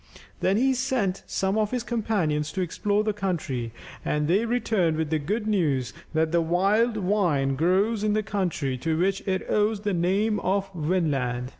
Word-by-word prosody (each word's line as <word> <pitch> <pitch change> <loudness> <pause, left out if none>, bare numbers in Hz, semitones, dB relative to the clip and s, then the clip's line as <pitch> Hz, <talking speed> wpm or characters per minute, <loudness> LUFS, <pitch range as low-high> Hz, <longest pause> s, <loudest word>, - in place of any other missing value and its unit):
Then 190 +2 +2
he 265 +3 +3
sent 250 -7 -1
some 195 +3 0
of 210 -1 +1
his 250 -1 -2
companions 195 -11 -1
to 190 - -1
explore 205 +4 0
the 215 -1 0
country, 160 - -2 0.3
and 150 0 0
they 195 +7 +2
returned 220 -9 +1
with 160 -1 -2
the 160 - +2
good 210 +9 -2
news 145 - 0 0.2
that 160 0 +2
the 170 0 +3
wild 200 +7 +2
vine 175 -9 +1
grows 195 +8 +2
in 210 -1 +2
the 215 0 +1
country, 180 -10 -2
to 160 +3 -1
which 195 +3 +1
it 190 -1 -1
owes 210 0 +1
the 205 -1 -1
name 195 +5 +1
of 195 +1 -1
Vinland. 145 -8 -1
190 Hz, 175 wpm, -26 LUFS, 160-210 Hz, 0.3 s, he